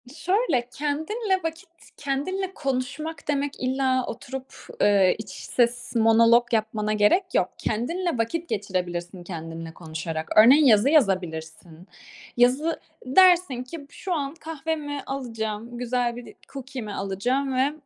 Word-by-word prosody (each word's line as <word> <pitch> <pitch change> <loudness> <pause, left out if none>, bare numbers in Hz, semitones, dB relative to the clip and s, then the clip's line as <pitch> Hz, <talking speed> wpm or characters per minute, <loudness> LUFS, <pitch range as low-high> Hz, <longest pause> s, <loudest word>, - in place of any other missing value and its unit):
Şöyle 335 - 0
kendinle 345 - -1
vakit 325 +1 -5 0.3
kendinle 365 +8 -2
konuşmak 280 +2 -4
demek 285 -1 0
illa 260 0 +1
oturup, 260 +3 -7 0.3
eee, 200 -3 +4
iç 215 -2 -8
ses 240 +5 -1
monolog 230 +1 +5
yapmana 215 -1 0
gerek 210 - +4
yok. - - +2
Kendinle 330 +9 -2
vakit 320 +10 -2
geçirebilirsin 180 -2 -3
kendinle 165 -2 -7
konuşarak. 160 -1 -5
Örneğin 260 +8 +8
yazı 225 0 +5
yazabilirsin. 175 - 0 0.5
Yazı, 265 +7 +3 0.3
dersin 345 -2 +4
ki 285 +6 -8
b - - -14
şu 365 +4 -4
an 280 -3 -2
kahvemi 310 -2 -4
alacağım, 230 -3 -4
güzel 245 -1 -1
bir 245 0 -9
de - - -12 0.2
cookie'mi 260 -5 -6
alacağım 245 +9 -1
ve 265 +3 +2
250 Hz, 125 wpm, -25 LUFS, 210-290 Hz, 0.5 s, Örneğin